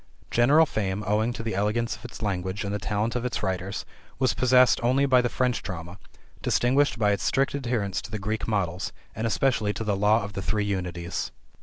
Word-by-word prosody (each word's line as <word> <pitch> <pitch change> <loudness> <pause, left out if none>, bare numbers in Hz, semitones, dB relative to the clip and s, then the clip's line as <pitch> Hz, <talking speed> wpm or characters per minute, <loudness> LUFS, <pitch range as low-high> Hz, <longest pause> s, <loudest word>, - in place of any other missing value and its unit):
General 140 +7 +5
fame, 105 -6 -2
owing 110 +4 +1
to 115 - -6
the 115 - -2
elegance 105 +4 0
of - - -16
its 120 -2 -9
language 95 -1 -2
and 100 0 -3
the 105 - -1
talent 105 +6 -1
of 125 - -1
its 125 - -3
writers, 95 +1 -2 0.3
was 130 0 +2
possessed 130 +1 +5
only 130 +4 +3
by 130 -2 +5
the 120 - 0
French 125 -1 0
drama, 90 -1 -7 0.4
distinguished 135 +2 +2
by 105 -2 +3
its 100 - 0
strict 135 +1 +1
adherence 120 -8 -1
to - - -10
the 110 - -3
Greek 105 +2 -3
models, 95 -4 -1 0.2
and 110 +2 -1
especially 110 -1 +1
to 110 - -4
the 105 -2 0
law 105 +2 +3
of 100 0 -6
the 100 - -4
three 100 +4 0
Unities. 90 -3 -3
105 Hz, 205 wpm, -26 LUFS, 100-120 Hz, 0.4 s, General